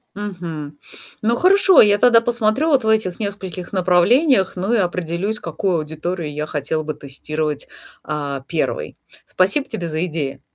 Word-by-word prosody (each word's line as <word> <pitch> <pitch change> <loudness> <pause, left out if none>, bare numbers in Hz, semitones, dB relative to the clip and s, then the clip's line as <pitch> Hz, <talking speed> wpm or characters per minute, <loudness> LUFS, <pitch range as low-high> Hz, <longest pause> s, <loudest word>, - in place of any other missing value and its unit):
Мгм. 170 -8 -6 0.5
Ну, 230 +2 +2
хорошо, 380 +2 +6
я 205 -1 +6
тогда 235 -1 +6
посмотрю 235 +5 0
вот 275 -5 +3
в 220 - -1
этих 220 -3 +1
нескольких 190 -4 -5
направлениях, 190 - +3
ну, 190 +5 -1
и 240 - +4
определюсь, 180 +2 -1
какую 190 -5 -2
аудиторию 160 +1 -4
я 150 0 -3
хотела 155 +1 -2
бы 155 0 -4
тестировать, 150 +1 -4 0.3
а, 145 -3 -4
1. 180 - -2 0.3
Спасибо 195 +11 +1
тебе 190 -8 -4
за 160 +2 -1
идеи. 150 -5 -4
180 Hz, 150 wpm, -20 LUFS, 155-220 Hz, 0.5 s, хорошо